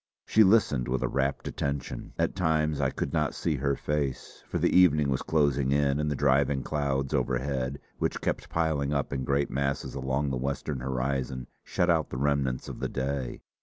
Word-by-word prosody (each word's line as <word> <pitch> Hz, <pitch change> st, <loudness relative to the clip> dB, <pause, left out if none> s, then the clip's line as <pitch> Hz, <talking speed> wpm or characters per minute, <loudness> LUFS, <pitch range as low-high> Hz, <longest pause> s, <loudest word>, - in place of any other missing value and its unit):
She 110 Hz, -, +5 dB
listened 95 Hz, -, +3 dB
with 65 Hz, 0 st, -1 dB
a -, -, +2 dB
rapt 70 Hz, 0 st, -1 dB
attention. 70 Hz, -1 st, -4 dB
At -, -, 0 dB
times 75 Hz, -4 st, +1 dB
I 65 Hz, -, +2 dB
could 70 Hz, -, -4 dB
not 75 Hz, -4 st, 0 dB
see 75 Hz, -4 st, -1 dB
her 70 Hz, +1 st, +1 dB
face, 70 Hz, -3 st, -3 dB
for -, -, -2 dB
the -, -, +2 dB
evening 75 Hz, -6 st, +5 dB
was 65 Hz, -, 0 dB
closing 70 Hz, -4 st, +2 dB
in 70 Hz, 0 st, +2 dB
and 75 Hz, 0 st, 0 dB
the 75 Hz, -, -1 dB
driving 70 Hz, 0 st, +2 dB
clouds 70 Hz, -2 st, -1 dB
overhead, 65 Hz, +1 st, -1 dB, 0.2 s
which -, -, -1 dB
kept -, -, -2 dB
piling 75 Hz, -3 st, 0 dB
up 70 Hz, 0 st, -1 dB
in 65 Hz, -1 st, -2 dB
great 70 Hz, +1 st, +1 dB
masses 70 Hz, 0 st, -1 dB
along 65 Hz, +1 st, -1 dB
the 65 Hz, -, -1 dB
western 70 Hz, +2 st, -3 dB
horizon, 65 Hz, 0 st, -2 dB, 0.2 s
shut 90 Hz, 0 st, +1 dB
out 80 Hz, -2 st, +1 dB
the -, -, -5 dB
remnants 70 Hz, -2 st, 0 dB
of -, -, -7 dB
the -, -, -2 dB
day. 65 Hz, -1 st, -3 dB
70 Hz, 190 wpm, -28 LUFS, 65-75 Hz, 0.2 s, She